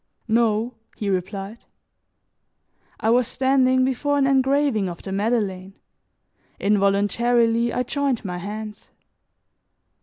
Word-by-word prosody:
"No," 225 +1 +1 0.2
he 205 -2 -2
replied. 195 +4 -4 1.4
I 220 - +1
was 245 0 +3
standing 260 0 +2
before 285 +3 0
an 275 - +3
engraving 270 -6 +2
of 170 - -9
the 195 - -6
Madeleine. 195 -2 -1 0.8
Involuntarily 225 +4 +2
I 250 - -1
joined 270 -3 -2
my 180 -1 -4
hands. 210 +3 -7
230 Hz, 100 wpm, -23 LUFS, 200-255 Hz, 1.4 s, was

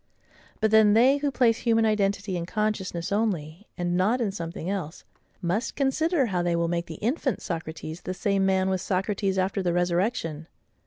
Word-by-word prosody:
But 220 - +2
then 220 -1 +6
they 255 +6 +5
who 285 0 0
place 240 -4 +2
human 225 -1 +2
identity 200 -2 0
in 170 -1 -3
consciousness 200 -5 -2
only, 195 -4 -2
and 175 -1 -1
not 205 +8 +2
in 220 -5 0
something 170 -3 -6
else, 185 -4 -4 0.4
must 185 +8 -1
consider 290 +2 +1
how 185 -6 -1
they 175 -1 +1
will 170 0 +1
make 170 0 -2
the 160 - -7
infant 250 - -1
Socrates 160 0 -6
the 185 - -5
same 200 0 +1
man 190 -1 +2
with 190 -1 -1
Socrates 195 +1 -1
after 190 +1 0
the 175 -2 0
resurrection. 175 -2 -1
195 Hz, 175 wpm, -26 LUFS, 175-220 Hz, 0.4 s, then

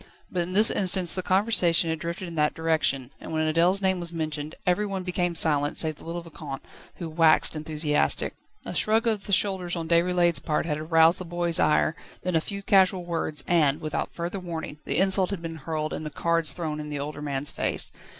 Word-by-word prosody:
But 180 - -1
in 175 +2 -4
this 210 +3 +5
instance 185 -2 +2
the 185 - -2
conversation 185 -4 +2
had 160 - -3
drifted 170 +2 -5
in 170 - -8
that 150 -2 +1
direction, 155 -5 0
and - - -8
when 155 0 0
Adèle's 180 +4 +2
name 190 -1 +2
was 170 -1 -1
mentioned, 155 -2 -4
every 180 +3 +2
one 195 -2 -4
became 180 -1 -1
silent, 145 -2 +2
save 155 -2 +1
the - - -14
little 170 +1 -5
Vicomte, 150 -4 -8 0.3
who 170 - -6
waxed 160 0 +4
enthusiastic. 155 -1 0 0.3
A - - -5
shrug 220 +2 +2
of 215 -3 -1
the - - -5
shoulders 185 -2 +2
on 165 -1 -4
Déroulède's 175 -1 +3
part 150 +2 -1
had 150 -2 -2
aroused 165 +2 +4
the - - -5
boy's 175 -1 0
ire, 155 +1 +2 0.3
then 180 -1 -1
a 160 - +3
few 200 +3 -6
casual 190 -2 +3
words, 160 -4 -1
and, 155 -4 +2
without 155 -1 -3
further 175 +3 -4
warning, 165 -4 -6
the - - 0
insult 190 -1 +4
had 195 -4 -5
been 165 -1 -6
hurled 155 0 -4
and - - -5
the 155 - -4
cards 165 +2 0
thrown 155 -3 -4
in 150 0 -6
the 145 - -4
older 145 +1 -5
man's 145 -1 -2
face. - - -1
170 Hz, 210 wpm, -26 LUFS, 155-180 Hz, 0.3 s, this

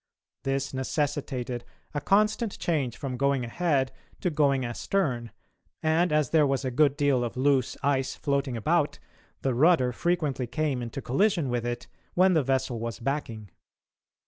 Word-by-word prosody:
This 135 0 -2
necessitated 130 -3 -2 0.3
a 145 - -2
constant 215 +3 +2
change 140 -9 -1
from 130 -3 -4
going 140 -2 +1
ahead 135 0 0 0.3
to 180 - 0
going 140 -4 +2
astern, 120 -1 -1 0.5
and, 160 +2 +2
as 150 -3 +2
there 155 -3 +5
was 135 0 0
a 130 - -1
good 145 +2 +3
deal 140 -4 +2
of 120 +1 -4
loose 135 -1 +2
ice 135 -2 +1
floating 140 -3 -1
about, 110 - +1 0.5
the 135 - +1
rudder 130 -1 +4
frequently 150 -3 -1
came 145 0 -1
into 120 +3 -5
collision 170 - +2
with 120 -1 -1
it 120 0 -3 0.3
when 185 +1 +5
the 160 - +4
vessel 130 -3 0
was 115 0 -4
backing. 115 - -3
135 Hz, 150 wpm, -27 LUFS, 125-155 Hz, 0.5 s, there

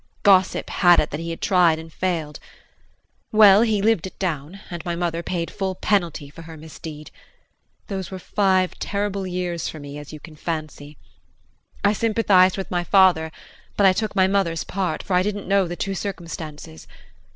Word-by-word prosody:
Gossip 190 -2 +3
had 175 -2 +5
it 150 - -1
that 145 - -4
he 165 0 -5
had 165 - -6
tried 175 -4 +3
and 160 0 -11
failed. 165 -5 -3 0.9
Well, 210 -1 +7
he 215 -4 +1
lived 215 -5 +2
it - - -13
down 165 0 -4
and 170 -2 -6
my 170 -1 -3
mother 170 -1 -2
paid 170 -1 -3
full 190 -2 -3
penalty 175 -8 -1
for 165 - -12
her 165 -1 -11
misdeed. 155 -1 -10 0.7
Those 190 -2 -5
were 190 - -6
five 185 -1 +1
terrible 200 -1 -2
years 180 -2 -3
for 155 - -8
me, 145 0 -8
as 150 - -10
you 155 - -9
can 155 0 -13
fancy. 150 -2 -6 0.9
I 205 0 +4
sympathized 205 -4 +3
with 195 - -5
my 175 -1 0
father, 175 -4 +4 0.5
but 200 - +4
I 190 - +6
took 215 +1 -3
my 190 -2 +4
mother's 190 -4 0
part, 185 -5 -3
for 195 - -4
I 180 - +4
didn't 205 +1 -3
know 195 -1 +2
the 175 - -5
true 195 +2 -3
circumstances. 165 - -7
180 Hz, 180 wpm, -22 LUFS, 160-195 Hz, 0.9 s, Well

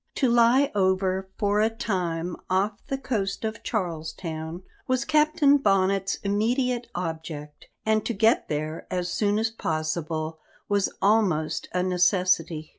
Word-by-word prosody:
To 260 -4 +2
lie 240 +4 +4
over 190 -1 +1
for 205 0 +2
a 220 - +3
time 180 -6 -2
off 200 +3 0
the 270 - -2
coast 220 -6 -2
of 220 +1 -4
Charles 165 -7 -3
Town 160 +1 -6 0.2
was 255 +1 +1
Captain 300 -1 +4
Bonnet's 195 -5 +2
immediate 240 +4 0
object, 160 -3 -6 0.2
and 220 -1 +2
to 235 - -1
get 220 +3 +3
there 155 +1 -3
as 180 -1 -2
soon 205 -1 +1
as 225 +1 0
possible 155 -3 -3 0.3
was 200 -1 +1
almost 195 -7 +2
a 180 0 0
necessity. 180 -3 +1
195 Hz, 135 wpm, -26 LUFS, 165-225 Hz, 0.3 s, lie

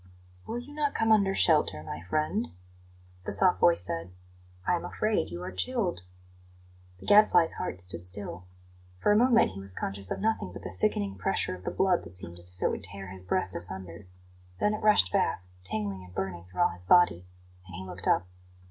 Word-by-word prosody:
"Will 235 - -3
you 250 +4 -8
not 295 -1 -1
come 225 0 +2
under 200 -3 +4
shelter, 150 - +3
my 80 0 -6
friend?" 155 - 0 0.8
the - - -3
soft - - +4
voice 85 0 +5
said. 85 0 -4 0.6
"I - - +2
am 175 - -1
afraid 215 0 -1
you 85 +1 -6
are 90 - -5
chilled." 185 - -1 1.0
The - - -12
Gadfly's 205 -5 +5
heart 90 - -4
stood 90 0 -2
still. 90 -2 -6 0.5
For 205 - +2
a - - +5
moment 235 - +4
he 95 - -9
was 95 -1 -1
conscious 95 0 -3
of - - -3
nothing 215 - -1
but - - -9
the 90 - -3
sickening 100 +1 +1
pressure - - 0
of 90 - -14
the - - 0
blood 185 -2 +2
that 85 - -10
seemed 85 -1 -4
as 90 +1 0
if 90 - -23
it - - +3
would - - -5
tear 95 0 -8
his 95 0 -10
breast 90 - -1
asunder; 90 +1 -6 0.5
then 210 - +2
it 215 - -4
rushed 210 - +4
back, 90 - +1 0.2
tingling 100 0 -2
and 90 0 -15
burning 95 -3 -4
through 90 0 -4
all - - +5
his 90 +1 -7
body, 90 - +4 0.4
and 90 - -10
he 95 0 -7
looked 95 - -4
up. 90 - +3
95 Hz, 200 wpm, -28 LUFS, -, 1.0 s, voice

